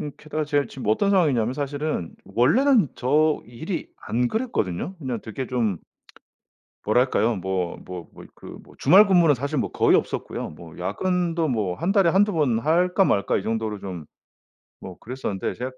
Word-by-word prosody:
음 150 -2 -4
게다가 155 0 -4
제가 145 -1 0
지금 130 -4 -8
어떤 200 - +2
상황이냐면 135 - +2
사실은 145 - -3
원래는 205 - +3
저 150 +4 +2
일이 160 - -6
안 120 +2 -1
그랬거든요. 190 - -2
그냥 130 -7 -4
되게 125 +4 -6
좀 110 -8 0 1.1
뭐랄까요? 120 0 +2
뭐 95 -2 -2
뭐 90 -2 -8
뭐 - - -13
그 - - -15 0.2
뭐 - - -18
주말 205 +4 +7
근무는 170 -6 +5
사실 140 +4 -3
뭐 - - -1
거의 - - +4
없었고요. - - -3
뭐 80 +1 -13
야근도 170 - -1
뭐 105 -8 -1
1 185 +4 0
달에 195 -5 +4
1-2 205 +4 +3
번 145 -9 +1
할까 180 - +2
말까 100 - +1
이 - - -5
정도로 110 -1 -2
좀 90 -5 -7 0.8
뭐 90 -2 -9
그랬었는데, 115 -5 -4
제가 125 +2 -5
130 Hz, 315 characters per minute, -24 LUFS, 110-170 Hz, 1.1 s, 주말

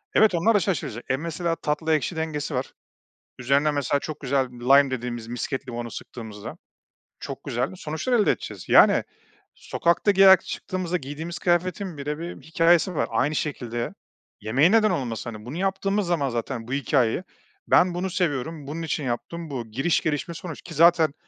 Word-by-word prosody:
evet, 215 -5 +5
onlar 175 +7 +3
da 205 - +5
şaşıracak 135 - -2
E, 130 - +2
mesela 165 +2 -2
tatlı 160 +1 -1
ekşi 155 +3 -2
dengesi 155 -2 -3
var. 125 +1 -3 0.7
Üzerine 140 +4 +2
mesela 145 -1 0
çok 155 0 -6
güzel 135 -1 0
lime 135 +3 +4
dediğimiz 120 -2 -4
misket 130 +2 -4
limonu 120 -1 -5
sıktığımızda 110 -4 -8 0.6
çok - - -7
güzel 120 +2 -1
sonuçlar 160 +10 -3
elde 220 -4 +4
edeceğiz. - - -7
Yani, - - +6 0.5
sokakta 170 +4 +1
giyerek 190 -1 +7
çıktığımızda 180 -1 -3
giydiğimiz 155 +4 -6
kıyafetin 180 0 0
bile 150 +1 -3
bir 170 +1 -7
hikâyesi 165 +2 +3
var. - - 0
Aynı 150 +1 +1
şekilde 120 -5 -3 0.5
yemeğin 135 - +3
neden 220 -1 +4
olmasın? 120 -3 -3
Hani, 105 0 -10
bunu 135 +7 -6
yaptığımız 195 +1 0
zaman 160 -6 +1
zaten 115 0 -4
bu 125 - -4
hikâyeyi, 135 +2 +1 0.4
"Ben 180 0 +4
bunu 180 +2 -2
seviyorum. 155 -3 -2
Bunun 155 +3 -5
için 160 -2 -2
yaptım. 155 +6 -4
Bu." 125 -5 -5
Giriş, 135 +9 +1
gelişme, 155 +2 -2
sonuç, 165 -1 -8
ki - - -10
zaten 165 -1 +5
150 Hz, 165 wpm, -25 LUFS, 130-175 Hz, 0.7 s, giyerek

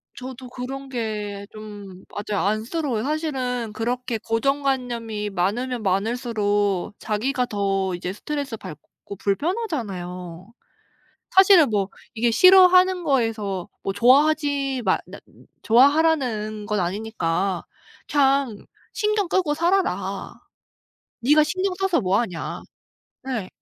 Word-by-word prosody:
저도 255 -1 -8
그런 265 +2 -6
게 210 -4 -4
좀 205 -3 -10
맞아요. 205 -1 -3
안쓰러워요. 225 +3 -1
사실은 260 -7 -2
그렇게 240 +1 -2
고정관념이 235 -3 -1
많으면 225 +7 -1
많을수록 205 -1 0
자기가 250 +5 -1
더 195 -3 -1
이제 180 +1 -5
스트레스받고 225 - -7
불편하잖아요. 195 - -3 0.8
사실은 375 - +6
뭐 200 -2 0 0.3
이게 235 +1 +1
싫어하는 365 +4 +6
거에서 225 - -1
뭐 195 - -2
좋아하지 275 +2 +3
마 - - +3
나 - - -10 0.4
좋아하라는 245 -5 +3
건 210 -2 0
아니니까 185 -2 -1 0.5
그냥 275 -2 +3
"그냥 - - -18 0.3
신경 420 -3 0
끄고 335 -6 +1
살아라. 360 +4 -1 0.9
네가 300 +5 +5
신경 370 +4 -1
써서 385 -3 +1
뭐 190 +1 +2
하냐." 180 -9 -4 0.6
네. 245 -8 -4
235 Hz, 255 characters per minute, -23 LUFS, 205-285 Hz, 0.9 s, 사실은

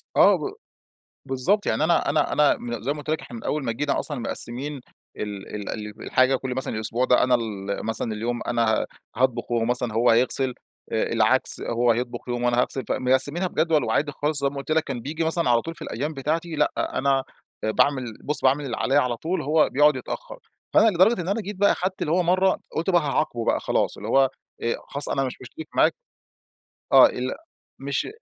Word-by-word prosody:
آه - - +6
ب 405 - -4 0.7
بالضبط، 135 +11 +1
يعني - - +1
أنا 165 -1 +2
أنا 150 +2 +1
أنا 150 -1 +4
م 120 -2 -5
زي 130 +6 -1
ما - - -9
قلت 145 - -8
لك 155 - 0
إحنا 120 - -10
من - - -10
أوّل 150 -1 -1
ما 120 - -1
جينا 145 +5 -1
أصلًا 145 -4 -3
مقسمين 130 +4 -2 0.4
ال 105 -1 -6
ال 105 -1 -5
ال 105 0 -6
الحاجة 130 +1 +3
كل 130 -1 -4
مثلًا 130 -3 -3
الأسبوع 110 +3 -1
ده 125 - +4
أنا 125 0 +4
ال 100 -4 -4
مثلًا 110 0 -1
اليوم 120 +3 -3
أنا 120 -1 +1 0.2
ه - - -3 0.3
هاطبخ، 120 -1 0
وهو 115 -1 +1
مثلًا 125 -1 -1
هو 115 +2 +3
هيغسل، 125 +2 +2 0.4
آآ - - +1
العكس - - +3
هو 120 +1 +1
هيطبخ 120 +1 -2
يوم 120 0 -2
وأنا 120 0 +3
هاغسل، 130 +1 -2
فمقسمينها 130 +8 +2
بجدول 160 -4 +1
وعادي 145 +7 0
خلاص 145 +1 -1
زي 140 - +2
ما 140 - -12
قلت 140 +2 -5
لك، 160 0 +3
كان 135 -5 -5
بييجي 155 +6 -3
مثلًا 165 -3 +1
على 120 -1 +4
طول 165 +4 -7
في 165 - -17
الأيّام 150 +1 -4
بتاعتي 160 +4 -2
لأ، - - +2 0.3
أنا 135 0 +2 0.4
آآ 110 - +1
باعمل 125 -2 +1
بُص 150 - 0
باعمل 140 +2 +2
اللي 120 -4 -4
عليَّ 135 - 0
على 125 -4 +1
طول 170 +9 -2
هو 155 +3 +3
بيقعد 150 +1 +4
يتأخر، - - -7 0.3
فأنا 225 - +6
لدرجة 190 +2 +3
إن 170 - -6
أنا 205 +4 0
جيت 205 +1 -6
بقى 200 +2 +3
خدت 185 +1 -3
اللي 150 - -1
هو 180 +1 +3
مرّة 185 +2 +2 0.2
قلت 165 +4 -1
بقى 175 -2 +4
هاعاقبه 140 -5 -1
بقى - - +2
خلاص - - -1
اللي 105 - -7
هو 135 +1 +4 0.3
آآ، 115 - 0
خلاص 140 +1 -2
أنا 135 - 0
مش 130 - -4
مشترك 130 +5 -9
معاك - - +4 1.0
آه، - - +9
ال 125 +1 -3 0.4
مش 140 0 -2
135 Hz, 215 wpm, -24 LUFS, 120-155 Hz, 1.0 s, آه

